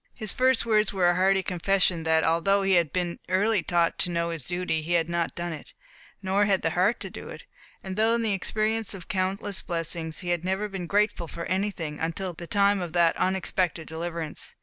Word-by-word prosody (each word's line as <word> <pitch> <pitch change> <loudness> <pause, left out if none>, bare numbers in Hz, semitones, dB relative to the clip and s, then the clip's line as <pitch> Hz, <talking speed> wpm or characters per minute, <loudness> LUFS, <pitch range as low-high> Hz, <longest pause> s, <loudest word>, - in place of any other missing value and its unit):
His 215 -4 -1
first 255 -1 +3
words 215 -2 +2
were 185 -3 +2
a 175 - +4
hearty 190 +1 +3
confession 180 -1 +1
that, 160 0 +3
although 195 +5 +2
he 195 0 +2
had 170 -4 +3
been 175 -2 -2
early 205 +2 +2
taught 170 0 +1
to - - +1
know 170 0 -1
his 165 -5 -5
duty, 175 -3 -1
he 165 +3 -2
had 165 -1 +2
not 170 -1 -2
done 175 -1 -3
it, 155 - -11 0.5
nor 195 +2 +2
had 195 -2 +1
the 165 - +1
heart 185 +7 +2
to - - -6
do - - -9
it; - - -9 0.4
and, 190 -1 -5
though 225 +2 +3
in 235 - -1
the 215 -2 +1
experience 215 +2 0
of 180 -3 -10
countless 195 +1 -2
blessings, 165 -1 -2
he 175 - -5
had 175 -1 0
never 190 +3 -1
been 190 -4 -6
grateful 205 -3 +1
for 170 +1 -6
any 195 +3 0
until 165 +3 -3
the 170 +1 -9
time 200 0 +3
of 170 -2 -5
that 170 -1 +3
unexpected 185 -3 0
deliverance. 165 -1 -4
180 Hz, 215 wpm, -26 LUFS, 170-195 Hz, 0.5 s, a